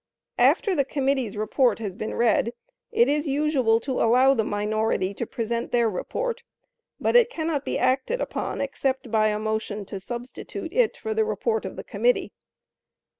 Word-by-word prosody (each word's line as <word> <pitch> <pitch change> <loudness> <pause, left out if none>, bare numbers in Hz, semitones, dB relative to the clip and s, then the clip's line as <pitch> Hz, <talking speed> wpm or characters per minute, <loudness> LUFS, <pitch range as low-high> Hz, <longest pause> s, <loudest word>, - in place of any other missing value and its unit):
After 400 - +4
the 285 - +2
committee's 265 -5 -1
report 225 +4 +2
has 205 -5 -5
been 215 - -4
read, 235 0 +2 0.4
it 235 - +4
is 295 +2 0
usual 275 -5 +2
to 260 +1 -2
allow 255 +4 +5
the 225 - +1
minority 210 -2 0
to 230 +3 -4
present 235 -1 -3
their 235 -1 +3
report, 485 - -3 0.6
but - - 0
it 485 -1 +6
cannot 315 - -2
be - - -2
acted 260 - +1
upon - - -3
except 270 -3 -2
by 215 -1 +3
a 210 0 0
motion 215 -1 -3
to 195 - -6
substitute 245 - -7
it 485 -1 +2
for 440 - -3
the 440 0 +2
report 450 +1 -1
of - - -6
the - - -7
committee. - - 0
255 Hz, 170 wpm, -25 LUFS, 220-300 Hz, 0.6 s, it